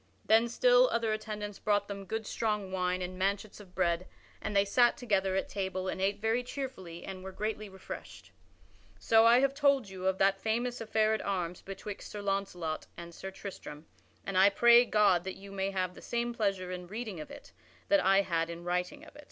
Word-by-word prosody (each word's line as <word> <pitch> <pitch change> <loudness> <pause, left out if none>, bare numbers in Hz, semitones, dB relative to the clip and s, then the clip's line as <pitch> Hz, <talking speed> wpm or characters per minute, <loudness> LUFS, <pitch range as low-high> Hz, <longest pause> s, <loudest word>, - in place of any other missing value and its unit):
Then 225 +2 +4
still - - +5
other 225 -2 0
attendants 210 -2 -5
brought 205 -1 +1
them 200 -1 -6
good 220 +3 -3
strong 210 -3 -2
wine 180 0 -1
and 185 +1 -6
manchets 200 +2 -1
of 185 -3 -15
bread 175 -1 0 0.3
and 215 -1 -4
they 200 0 +5
sat 240 +4 +4
together 195 -5 0
at 190 - 0
table 190 -1 -3
and 185 - -3
ate 200 +1 0
very 225 +3 +1
cheerfully 245 -10 -7
and 185 -1 -7
were 190 - -6
greatly 215 +1 -4
refreshed. 190 -1 -10 0.7
So 225 0 +5
I 240 +2 +6
have 275 0 +2
told 280 -6 +2
you 190 -1 -4
of 190 0 +1
that 195 0 +2
famous 240 +3 -1
affair 220 -1 +2
at 220 - -1
arms 180 -3 -3
betwixt 195 +1 -8
Sir 205 -1 -7
Launcelot 190 -5 -2
and 170 0 -9
Sir 190 - -7
Tristram, 185 -6 -9 0.4
and 190 -2 0
I 195 +2 +7
pray 240 +4 +6
God 205 -6 +3
that 190 0 -5
you 195 0 -11
may 195 0 -1
have 185 -2 -2
the - - -13
same 240 0 -2
pleasure 195 -5 -1
in 180 -1 -6
reading 215 -2 -5
of 155 - -8
it 285 0 -12 0.4
that 300 -1 +4
I 195 +1 +5
had 165 -2 -1
in 170 0 -7
writing 180 - -2
of - - -16
it. - - -13
200 Hz, 205 wpm, -31 LUFS, 185-225 Hz, 0.7 s, I